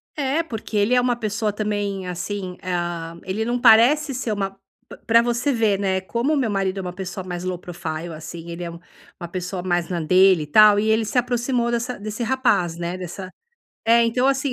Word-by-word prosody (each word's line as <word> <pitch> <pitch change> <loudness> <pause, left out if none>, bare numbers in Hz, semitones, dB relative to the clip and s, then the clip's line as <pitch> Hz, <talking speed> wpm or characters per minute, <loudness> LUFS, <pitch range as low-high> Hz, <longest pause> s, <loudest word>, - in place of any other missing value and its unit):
Eh, 290 +3 0
porque 225 -5 -5
ele 210 +5 +3
é 250 - +4
uma 245 -1 +1
pessoa 215 -2 -2
também, 205 -3 -2
assim, 180 +1 -5
ah, 175 -2 -3
ele 210 +4 -2
não 245 +1 -1
parece 255 +6 +5
ser 245 -3 -3
uma 195 -2 -2 0.4
p - - -10
pra 230 +1 +5
você 240 +4 0
ver, 220 -5 +2
né, 190 -1 0
como 240 +10 -1
meu 255 -6 0
marido 195 -1 -1
é - - -2
uma 180 -1 -5
pessoa 190 0 -6
mais 180 -1 -5
assim 185 - -2
low 175 - -5
profile. 165 -2 -6
assim. 165 +2 -9
Ele 170 +1 -6
é 170 - -5
um 170 - -10 0.4
uma 175 - -6
pessoa 180 +1 -4
mais 175 -2 -1
na 175 -2 -2
dele 185 0 +4
e - - -9
tal. 210 +4 +6
E 215 +1 0
ele 220 +1 +3
se 245 - -3
aproximou 245 0 0
dessa 235 -1 -2
desse 215 +3 -4
rapaz, 225 -10 +1
né. 175 +1 -4
Dessa 185 +1 -7 0.6
Eh, 230 +1 +5
então, 250 +3 +2
assim: 270 -1 0
205 Hz, 215 wpm, -22 LUFS, 180-235 Hz, 0.6 s, tal